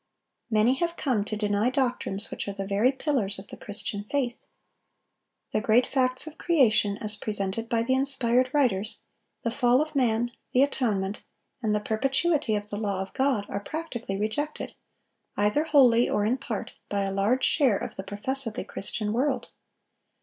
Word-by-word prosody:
Many 220 +2 +4
have 340 0 -1
come 250 -11 0
to 215 - -4
deny 210 +2 +1
doctrines 250 -6 -1
which - - -4
are 200 - -3
the 195 0 -4
very 205 +6 +3
pillars 260 -8 -1
of 195 +1 -11
the - - -8
Christian 205 0 -2
faith. 250 0 -2 1.1
The 215 - 0
great 230 +3 +4
facts 255 0 +1
of 315 0 -10
creation 220 - +3
as 215 -1 -1
presented 210 +1 -3
by 230 -1 +1
the 260 +3 +1
inspired 255 -2 +3
writers, 235 -8 +1 0.4
the 230 - 0
fall 245 0 +3
of 305 0 -2
man, 240 -2 +1 0.2
the 255 - +5
atonement, 210 -8 -1 0.4
and 215 -3 +1
the - - +2
perpetuity 270 +4 +1
of 210 0 -4
the 205 - -2
law 200 -3 -2
of 195 - -12
God, 265 -6 +1
are 200 - -3
practically 235 -6 -5
rejected, 290 +9 -3 0.6
either 210 +10 +2
wholly 250 -6 +5
or 205 - +1
in 245 +5 +1
part, 220 -4 -5 0.2
by 200 -1 0
a 195 - -2
large 215 +7 +1
share 260 -10 +3
of - - -6
the - - -4
professedly 220 +4 -3
Christian 210 +1 -2
world. 260 +3 0
230 Hz, 170 wpm, -27 LUFS, 205-265 Hz, 1.1 s, the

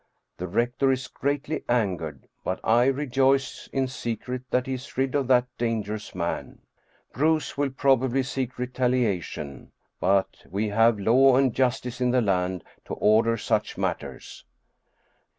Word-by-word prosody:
The 90 - -4
rector 120 +7 +1
is 130 0 -2
greatly 145 +2 -2
angered, 90 - -1 0.2
but 95 - -2
I 120 +2 +4
rejoice 135 0 +1
in 135 -1 0
secret 125 0 -4
that 125 0 +1
he 135 - -3
is 130 +1 -8
rid 130 0 +1
of 140 -3 +1
that 125 -1 +4
dangerous 110 -4 -2
man. 85 -1 -4 0.5
Bruus 155 +3 +1
will 145 0 0
probably 130 -1 +2
seek 130 0 -3
retaliation, 120 - -2 0.3
but 95 +1 +1
we 105 +4 -1
have 115 +2 +4
law 125 +6 +5
and 130 -2 +3
justice 125 -1 -1
in 125 - +3
the 125 +1 +3
land 90 -4 0 0.2
to - - -5
order 115 +2 +3
such - - -1
matters. - - -4
125 Hz, 140 wpm, -26 LUFS, 110-130 Hz, 0.5 s, law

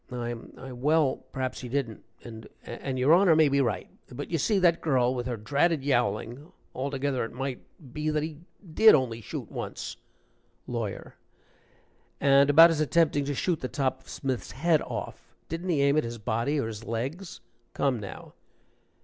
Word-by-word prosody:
"I 120 -1 -3 0.2
I 135 0 -9
well, 145 +3 +2
perhaps 130 -1 -3
he 125 - -7
didn't 125 -4 -3 0.2
and 110 -2 -10 0.2
and 130 +2 -5
your 130 +5 +4
Honor 180 -2 +6
may 155 -2 +5
be 140 0 +2
right. 110 -8 -1 0.2
But 140 +6 -7
you 165 - 0
see, 205 +8 +2
that 175 -3 +3
girl, 130 -5 +2
with 125 -1 -3
her 120 -2 -3
dratted 145 +7 +1
yowling 120 +1 -1 0.2
altogether, 135 0 -2
it 115 - -6
might 135 0 -4 0.3
be 150 0 -2
that 150 -1 0
he 155 -1 -6 0.3
did 220 +3 +8
only 120 -5 -1
shoot - - -7
once." - - -6 0.7
LAWYER. 115 -5 -5 1.1
"And 140 0 +5
about 165 +4 +8
his 155 -2 0
attempting 155 -2 +2
to 145 0 -2
shoot 170 +3 0
the 130 - -3
top 130 -1 -2
of - - -19
Smith's 130 -6 -4
head 160 +2 +2
off - - -7
didn't 165 +3 -4
he 150 -5 +2
aim 140 +1 +3
at 155 - +3
his 115 0 -5
body, 115 +7 -1
or 135 - -1
his 110 -1 -6
legs? 135 +12 -5 0.4
Come 135 -4 +1
now." 100 - -9
135 Hz, 175 wpm, -27 LUFS, 120-155 Hz, 1.1 s, did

